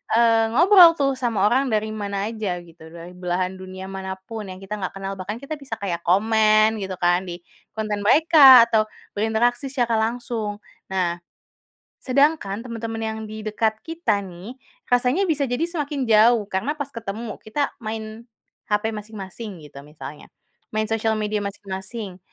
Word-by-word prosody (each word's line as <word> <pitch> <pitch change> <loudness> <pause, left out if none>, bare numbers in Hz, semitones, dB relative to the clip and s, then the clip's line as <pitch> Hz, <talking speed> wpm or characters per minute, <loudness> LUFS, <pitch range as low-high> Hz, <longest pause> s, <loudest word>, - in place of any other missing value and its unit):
eee, 230 -1 +4
ngobrol 355 0 +8
tuh 275 -3 +1
sama 230 -6 0
orang 265 +4 +2
dari 215 0 +1
mana 200 -1 -3
aja 205 -5 -3
gitu, 165 -1 -15
dari 170 +1 -10
belahan 180 +1 -2
dunia 185 0 -8
manapun 190 +3 -6
yang 185 - -7
kita 200 +2 -5
enggak 185 - -4
kenal 195 0 -4
bahkan 200 +4 -4
kita 280 +4 -6
bisa 270 -5 -6
kayak 175 -4 -2
komen 215 +3 +4
gitu 190 -1 -4
kan, 175 +1 +2
di 175 0 -6 0.4
konten 215 -1 -2
mereka 285 -3 +8
atau 220 -2 +3 0.3
berinteraksi 235 +5 +1
secara 240 -4 0
langsung. 225 -2 -2 0.3
Nah, 180 -2 0 0.9
sedangkan 260 -6 +1
teman-teman 225 -1 -5
yang 220 0 -4
di 215 0 -7
dekat 220 0 0
kita 325 -10 0
nih, 185 +7 -10 0.4
rasanya 250 +9 +3
bisa 300 -3 +1
jadi 245 +5 -1
semakin 295 -4 -3
jauh 220 +1 +6
karena 210 +11 -1
pas 285 -1 -4
ketemu, 225 -2 -6
kita 280 +7 -1
main 220 0 -6 0.4
hape 210 +1 0
masing-masing 210 -3 -8
gitu 140 -1 -13
misalnya. 150 -1 -10 0.5
Main 215 0 0
sosial 225 0 +1
media 210 -1 -1
masing-masing 195 0 -6
215 Hz, 155 wpm, -23 LUFS, 195-240 Hz, 0.9 s, ngobrol